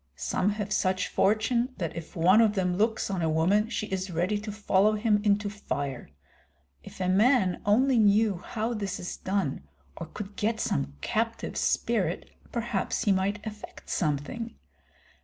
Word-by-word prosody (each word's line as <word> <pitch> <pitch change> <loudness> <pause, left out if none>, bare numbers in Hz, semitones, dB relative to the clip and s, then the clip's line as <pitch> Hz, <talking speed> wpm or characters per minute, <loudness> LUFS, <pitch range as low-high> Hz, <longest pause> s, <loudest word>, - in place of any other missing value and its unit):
Some 185 - 0
have 210 -1 -3
such 185 0 0
fortune 235 +5 +1
that 170 -4 -3
if 165 -1 -8
one 185 +6 +5
of 215 -2 +3
them 180 -2 +1
looks 220 +1 0
on 190 -3 -1
a 160 - +1
woman 190 +8 +2
she 230 - -2
is 190 -1 -3
ready 180 +5 0
to 210 +1 -6
follow 205 0 +2
him 210 -1 +2
into 205 0 +2
fire. 140 - -4 0.7
If - - -13
a 185 - 0
man 195 -1 +3
only 250 +4 +4
knew 210 -1 +4
how 225 +5 -3
this 200 -3 -3
is 175 - -5
done 185 - -2 0.3
or 165 - -7
could 200 +4 -8
get 220 +1 -1
some 70 0 -1
captive 225 +1 -2
spirit, - - 0 0.2
perhaps 230 -5 -1
he 205 - +3
might 200 +3 0
effect 210 -1 -9
something. 170 +9 -2
205 Hz, 160 wpm, -28 LUFS, 185-220 Hz, 0.7 s, one